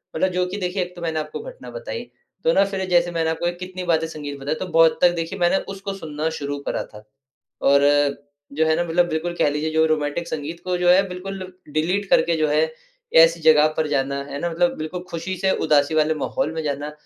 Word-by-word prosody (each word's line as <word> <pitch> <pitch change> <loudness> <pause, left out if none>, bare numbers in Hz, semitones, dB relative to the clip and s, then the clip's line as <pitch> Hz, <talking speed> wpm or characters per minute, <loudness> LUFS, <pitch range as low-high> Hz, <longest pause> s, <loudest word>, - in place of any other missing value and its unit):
मतलब 185 +4 +2
जो 180 0 0
कि 185 +3 -5
देखिए 180 +1 -1
एक 180 0 -10
तो 175 - -10
मैंने 160 -2 -1
आपको 150 0 -5
घटना - - -10
बताई। - - -6 0.4
तो - - +4
ना - - +5
फिर 195 -1 -3
जैसे 175 -1 +3
मैंने 165 -1 0
आपको 165 +2 -1
कितनी 185 0 -6
वाद्य 165 -2 +1
संगीत 145 -3 -7
बताई, 145 +3 -2
तो 185 - -4
बहुत 165 -2 +4
तक 180 - +6
देखिए 165 -1 -4
मैंने 175 +2 +3 0.2
उसको 195 0 -5
सुनना 160 -4 -3
शुरू 145 0 -3
करा - - -1
था 105 0 -12 0.6
और 140 0 +5 0.7
जो 160 +3 +1
है 160 0 +3
ना 175 - 0
मतलब 175 +1 +2
बिल्कुल 170 +2 -2
कह - - +3
लीजिए 150 +2 -2
जो 160 0 +3
रोमांटिक 155 +2 -1
संगीत 160 +2 -5
को 180 -1 0
जो 175 0 +4
है 190 +2 +5
बिल्कुल 190 +2 -6 0.3
डिलीट 180 +6 0
करके 170 -1 +4
जो 155 -1 +2
है 150 +1 +3 0.6
ऐसी 165 0 0
जगह 155 -1 +6
पर 155 - 0
जाना 140 -1 -1
है 140 0 -6
ना? 175 - -1
मतलब 175 +1 +1
बिल्कुल 175 +3 -5
ख़ुशी 170 +3 -3
से 190 - +4 0.2
उदासी 145 0 +3
वाले 155 0 +3
माहौल 265 -10 -1
में 160 - -3
जाना, 145 0 -3
165 Hz, 225 wpm, -22 LUFS, 155-180 Hz, 0.7 s, तक